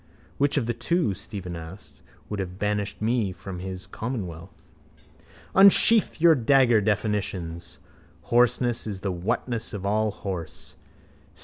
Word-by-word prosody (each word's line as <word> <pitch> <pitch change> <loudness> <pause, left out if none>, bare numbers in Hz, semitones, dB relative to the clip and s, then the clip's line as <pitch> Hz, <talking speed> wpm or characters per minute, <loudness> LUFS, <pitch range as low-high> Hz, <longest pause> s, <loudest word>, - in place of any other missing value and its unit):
—Which 145 +1 +2
of 130 - +1
the 120 - -1
two, 120 - 0
Stephen 90 -2 -7
asked, 80 +4 -11 0.3
would 105 - -4
have 95 -1 -5
banished 105 0 -2
me 110 -3 +1
from 90 0 -8
his 95 0 -6
commonwealth? 95 -6 -6 0.9
Unsheathe 200 +3 +6
your 165 0 +6
dagger 125 -3 +4
definitions. 95 -5 -2 0.6
Horseness 120 -1 +2
is 100 -3 -5
the 100 - -2
whatness 115 +5 -2
of 100 -1 -6
allhorse. 100 -4 -3
105 Hz, 120 wpm, -25 LUFS, 95-120 Hz, 0.9 s, Unsheathe